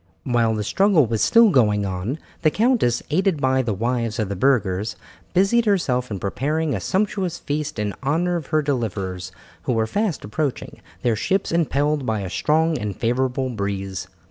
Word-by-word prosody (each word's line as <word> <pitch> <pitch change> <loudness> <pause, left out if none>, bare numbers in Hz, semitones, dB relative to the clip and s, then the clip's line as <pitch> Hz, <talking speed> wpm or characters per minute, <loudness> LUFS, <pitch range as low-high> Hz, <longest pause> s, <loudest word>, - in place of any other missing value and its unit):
While 115 -3 +1
the 105 - -2
struggle 190 - +3
was 115 -1 -1
still 230 -2 +6
going 105 - +3
on, 95 +8 -3 0.2
the 155 - +4
countess, 215 - +2
aided 185 0 +2
by 130 -1 +2
the 115 -5 -2
wives 115 +1 -1
of 110 -4 -1
the 100 - -2
burghers, 105 -3 +1 0.4
busied 200 +6 +3
herself 130 -11 +1
in 100 - -3
preparing 150 - -1
a 105 - -1
sumptuous 190 - -1
feast 150 0 -3
in 105 -2 -2
honour 165 +6 +1
of 165 -4 -4
her 155 -1 +1
deliverers 95 -9 -3 0.3
who - - +1
were 110 -1 +1
fast 200 - -1
approaching, 135 +5 -3 0.2
their 120 -2 +2
ships 190 - 0
impelled 150 -3 +1
by 110 -4 -1
a 95 -2 -5
strong 160 +1 +1
and 105 -2 -3
favourable 130 +2 0
breeze. 100 -3 -4
130 Hz, 170 wpm, -22 LUFS, 105-160 Hz, 0.4 s, still